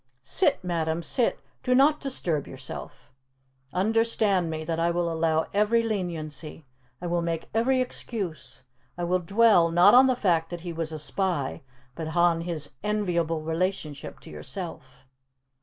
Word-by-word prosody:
"Sit, 285 - +1
madam, 165 -2 -1
sit. 235 +8 0 0.2
Do 250 - +2
not 290 +3 +5
disturb 170 - -1
yourself! 130 -1 -8 0.6
Understand 210 -3 +2
me, 160 0 -4
that 165 0 -2
I 170 +1 +2
will 170 -1 0
allow 160 0 +1
every 210 +3 +3
leniency. 165 -7 -4 0.3
I - - -7
will 175 0 0
make 165 -1 -3
every 255 +4 +2
excuse! 175 - -5 0.3
I 175 - -3
will 180 +1 +1
dwell, 195 -1 +4
not 175 +4 +6
on 255 +2 +8
the 255 - +2
fact 170 -8 +1
that 175 -1 -6
he 175 -1 -5
was 165 -1 -3
a 155 - -4
spy, 150 0 -2 0.3
but 160 +3 -5
on 170 -1 +4
his 165 -4 -4
enviable 170 -7 0
relationship 160 -3 -3
to - - -12
yourself." - - -7
175 Hz, 150 wpm, -26 LUFS, 160-210 Hz, 0.6 s, on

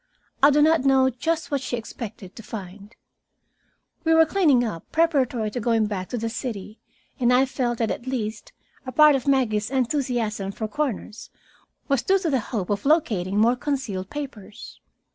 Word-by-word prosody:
I 280 - +8
do 295 +1 +4
not 320 -2 +4
know 265 -1 +4
just 320 +7 -2
what 280 -2 0
she 255 -2 -3
expected 220 -4 -8
to - - -9
find. 205 -1 -9 1.1
We 325 0 +3
were 325 0 +6
cleaning 305 -9 +3
up 210 -9 -6
preparatory 265 -9 +1
to 245 - -3
going 225 -1 +2
back 195 -3 -4
to 245 - -3
the 230 0 -2
city, 225 -3 -6 0.4
and 245 -1 +3
I 255 +2 +5
felt 245 -3 -2
that 225 -2 0
at 240 - -6
least 220 -4 -4 0.4
a - - -3
part 300 +3 +6
of 265 0 -3
Maggie's 220 -7 +1
enthusiasm 240 -6 -1
for 220 +2 -4
corners 225 -3 -4 0.6
was 275 -4 +1
due 390 - +3
to 340 -6 -2
a - - +2
hope 210 -4 -4
of 200 0 -1
locating 220 - +1
more 230 +4 +4
concealed 245 -9 -3
papers. 245 -9 -8
245 Hz, 175 wpm, -24 LUFS, 215-275 Hz, 1.1 s, I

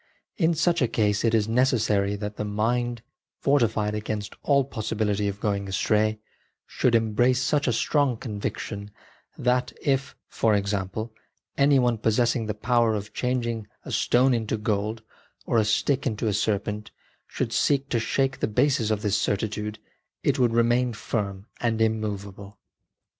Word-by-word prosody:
In 170 -3 +2
such 170 +1 +2
a 125 - +4
case 105 -2 +1
it 115 -1 +3
is 110 -1 +2
necessary 110 -5 +2
that 105 0 -5
the - - -2
mind, 115 +3 -1 0.3
fortified 110 -6 +1
against 105 -1 -4
all 140 -2 +3
possibility 105 -4 -1
of 100 0 -4
going 100 -1 -1
astray, 110 +3 +1 0.5
should 120 -2 +1
embrace 120 +3 +2
such 140 +3 +1
a - - +3
strong 135 +1 +1
conviction 105 -2 -5 0.5
that, 125 0 +1
if, 135 -1 0
for 110 -2 +1
example, 100 +2 -2 0.4
any 140 0 +4
one 120 -3 +2
possessing 115 +1 +1
the 105 - -2
power 115 0 +2
of 105 0 -6
changing 120 -4 -2 0.2
a - - -7
stone 130 +2 +3
into 110 -2 -1
gold, 105 +1 -2 0.4
or 115 - +2
a - - +3
stick 130 +6 +1
into 110 -1 -2
a 105 - +1
serpent, 105 0 -1 0.4
should - - -3
seek 140 -1 +2
to 120 - +1
shake 135 +3 0
the - - 0
bases 125 0 +2
of 105 -1 -1
this 105 -2 +1
certitude, 105 +1 -2 0.5
it - - +1
would 120 -2 +3
remain 120 +1 +2
firm 100 -3 -3
and 115 -2 0
immovable. 105 -2 -2
110 Hz, 155 wpm, -25 LUFS, 105-125 Hz, 0.5 s, a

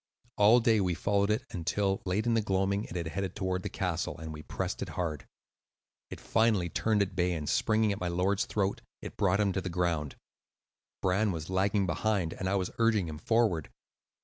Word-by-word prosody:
All 105 +4 +6
day 115 -3 +3
we 90 -2 0
followed 100 +2 +1
it, 110 +3 0
until, 95 +3 -1
late 100 +5 0
in 120 - +2
the 115 - +3
gloaming, 100 0 0
it - - -9
had 85 -2 -2
headed 95 +2 -3
toward 95 -2 -1
the - - -4
castle; - - -2
and 80 0 -7
we 75 - -8
pressed - - -4
it - - -3
hard. 80 -6 -3 0.8
It - - -8
finally 110 -6 +2
turned 105 +5 +2
at 95 -1 -7
bay, 90 -1 +1
and, 75 -3 -4
springing 110 +4 +2
at 100 - -3
my 90 - -2
lord's 90 +3 +1
throat, 100 -2 -1 0.2
it - - -7
brought 100 -1 +2
him 100 -2 +2
to 95 - -1
the 95 - -4
ground. 85 -5 -1 0.9
Bran 100 +3 +2
was 80 0 -5
lagging 100 +1 +2
behind, 95 -1 0
and 95 - -3
I 100 - +1
was 95 -2 -1
urging 110 -6 +3
him 75 -1 -7
forward. 110 -6 +1
95 Hz, 200 wpm, -30 LUFS, 90-105 Hz, 0.9 s, All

